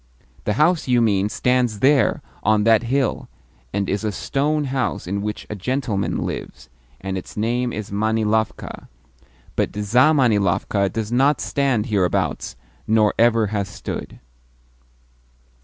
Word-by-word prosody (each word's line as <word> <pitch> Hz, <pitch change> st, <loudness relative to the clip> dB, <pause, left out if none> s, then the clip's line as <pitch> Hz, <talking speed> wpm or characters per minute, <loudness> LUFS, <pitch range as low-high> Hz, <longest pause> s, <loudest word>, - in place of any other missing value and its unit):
The 105 Hz, -, +1 dB
house 155 Hz, -, +2 dB
you 125 Hz, -1 st, +3 dB
mean 105 Hz, -3 st, +2 dB
stands 125 Hz, -2 st, +1 dB
there, 135 Hz, -1 st, +3 dB, 0.2 s
on 110 Hz, -1 st, +2 dB
that 110 Hz, -1 st, +5 dB
hill, 130 Hz, +1 st, -1 dB, 0.4 s
and 100 Hz, -1 st, -1 dB
is 100 Hz, +2 st, -1 dB
a 105 Hz, -, 0 dB
stone 150 Hz, +7 st, -1 dB
house 135 Hz, -2 st, -2 dB
in 100 Hz, +3 st, -2 dB
which 105 Hz, 0 st, -4 dB
a -, -, -5 dB
gentleman 115 Hz, -1 st, -2 dB
lives, 65 Hz, -, -7 dB, 0.3 s
and 95 Hz, 0 st, -3 dB
its 90 Hz, -, -12 dB
name 120 Hz, +3 st, 0 dB
is 105 Hz, -3 st, -6 dB
Manilovka; 110 Hz, +1 st, -1 dB, 0.7 s
but -, -, 0 dB
ZAmanilovka 105 Hz, -, +2 dB
does 110 Hz, +1 st, -3 dB
not 135 Hz, +4 st, +3 dB
stand 135 Hz, -6 st, 0 dB
hereabouts, 100 Hz, -7 st, -1 dB, 0.3 s
nor 110 Hz, -1 st, +3 dB
ever 115 Hz, -1 st, +4 dB
has 100 Hz, -3 st, -1 dB
stood." 90 Hz, -, -7 dB
110 Hz, 130 wpm, -21 LUFS, 105-125 Hz, 0.7 s, that